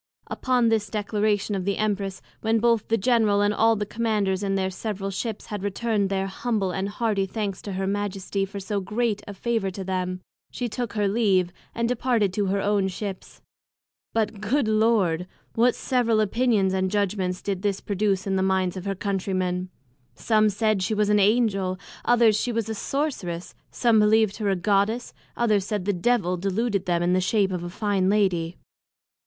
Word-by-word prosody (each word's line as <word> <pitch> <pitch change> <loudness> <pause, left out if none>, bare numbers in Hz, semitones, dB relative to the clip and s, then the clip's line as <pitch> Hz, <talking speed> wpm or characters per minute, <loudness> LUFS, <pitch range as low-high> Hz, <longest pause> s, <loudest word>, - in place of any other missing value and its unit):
Upon 250 -2 +1
this 215 -2 +1
Declaration 210 0 0
of 190 -2 -1
the 200 +1 -1
Empress, 200 -3 -2 0.2
when 225 +1 +1
both 230 -1 +2
the 225 - +2
General, 220 -2 +3
and 205 0 +2
all 225 +1 +4
the 210 -1 -2
Commanders 205 -4 0
in 195 -1 0
their 190 -1 0
several 195 0 -4
Ships, 210 +3 -4
had 210 -2 -5
return'd 205 0 0
their 195 0 0
humble 195 -1 -1
and 190 +2 -2
hearty 205 -2 0
Thanks 200 -1 -3
to 200 - -6
Her 190 +1 -2
Majesty 200 0 -2
for 200 +1 -5
so 200 +1 -2
great 210 +2 -1
a 205 - -7
favour 225 -1 -1
to 190 +1 -6
them, 185 -1 -2 0.3
she 245 - -3
took 240 0 -4
her 210 -2 +1
leave, 195 -4 +2 0.2
and 235 0 0
departed 235 -5 +1
to 205 0 0
her 195 +1 +1
own 200 -1 +1
Ships. 190 0 -7 0.7
But, 215 -2 -1
good 240 +4 +1
Lord! 215 -6 +2 0.3
what 240 +2 +3
several 235 -4 +1
Opinions 215 -3 +2
and 190 0 +1
Judgments 190 -2 -1
did 195 -2 -2
this 200 -1 0
produce 200 -1 0
in 195 -1 0
the - - +1
minds 190 -1 +1
of 185 0 -6
her 195 0 -1
Country 195 0 -2
men! 180 0 -1 0.5
some 215 -1 +3
said 215 0 +1
she 200 +4 0
was 210 0 +1
an 210 0 +4
Angel; 200 -3 +2 0.3
others, 235 -3 +4
she 240 +3 0
was 230 -2 -1
a 220 - -2
sorceress; 215 - -3 0.2
some 230 -3 +3
believed 215 -1 +3
her 210 -3 -1
a 195 - +2
Goddess; 205 +5 0 0.2
others 215 -4 +2
said 205 -4 -2
the 205 - +1
Devil 180 -1 +1
deluded 200 +1 -1
them 175 -1 +1
in 175 +1 +2
the 185 - +3
shape 195 0 +2
of 180 -2 -3
a 175 - -5
fine 195 -1 0
Lady. 180 -5 +1
205 Hz, 190 wpm, -25 LUFS, 190-220 Hz, 0.7 s, all